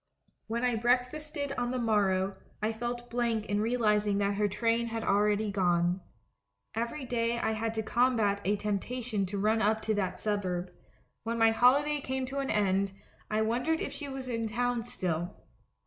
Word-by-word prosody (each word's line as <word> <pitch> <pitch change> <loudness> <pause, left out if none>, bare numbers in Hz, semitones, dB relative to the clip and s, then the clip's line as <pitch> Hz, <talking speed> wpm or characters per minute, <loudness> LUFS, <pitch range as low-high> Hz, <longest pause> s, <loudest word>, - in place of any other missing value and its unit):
"When 235 +2 -2
I 245 -2 +2
breakfasted 280 +5 0
on 245 0 0
the 255 - -1
morrow, 200 -5 +1 0.2
I 215 +1 0
felt 240 +2 -4
blank 235 -3 0
in 205 0 0
realising 210 -3 +2
that 200 0 +1
her 205 +1 +1
train 230 +3 +1
had 225 -1 -3
already 210 +1 +2
gone. 175 -1 +2 0.7
Every 235 +5 -3
day 235 -1 0
I 230 - 0
had 220 +1 -2
to 220 - -1
combat 225 -4 +2
a 205 +2 +2
temptation 210 +1 -2
to 200 +2 -4
run 215 +3 +2
up 220 +1 +3
to 220 - +1
that 195 -3 -1
suburb. 185 -4 -2 0.5
When 230 +1 -2
my 225 0 +5
holiday 280 +6 +4
came 265 -1 -2
to 270 +2 -4
an 275 - -2
end, 195 -1 +1 0.4
I 215 +1 +1
wondered 250 +9 +1
if - - -3
she 290 - -5
was 265 -1 -6
in 230 -2 -1
town 245 +1 0
still. 175 -8 -3
225 Hz, 175 wpm, -30 LUFS, 205-245 Hz, 0.7 s, my